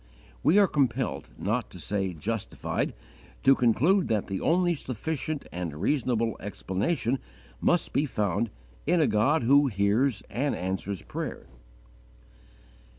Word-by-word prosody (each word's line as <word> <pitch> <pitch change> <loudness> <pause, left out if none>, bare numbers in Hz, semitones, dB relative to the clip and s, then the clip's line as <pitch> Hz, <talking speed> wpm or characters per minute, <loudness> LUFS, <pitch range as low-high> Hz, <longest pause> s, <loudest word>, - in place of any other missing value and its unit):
_ - - -26
We 185 - +4
are 205 - +7
compelled, 135 -5 0
not - - -1
to - - -11
say 95 -2 -1
justified, 75 - -3 0.5
to 135 - +7
conclude 140 - +3
that 105 -3 0
the 95 -1 -4
only 175 +1 +3
sufficient 145 +2 -4
and 85 -4 -4
reasonable 115 - +1
explanation 110 - -1 0.4
must 175 - +2
be 145 +2 +2
found 105 -1 0 0.4
in 175 +2 +4
a 155 - +5
God 120 +6 +2
who 140 +4 +5
hears 105 +3 +1
and 140 +2 -1
answers 95 0 -3
prayer. - - -5
120 Hz, 130 wpm, -28 LUFS, 100-145 Hz, 0.5 s, are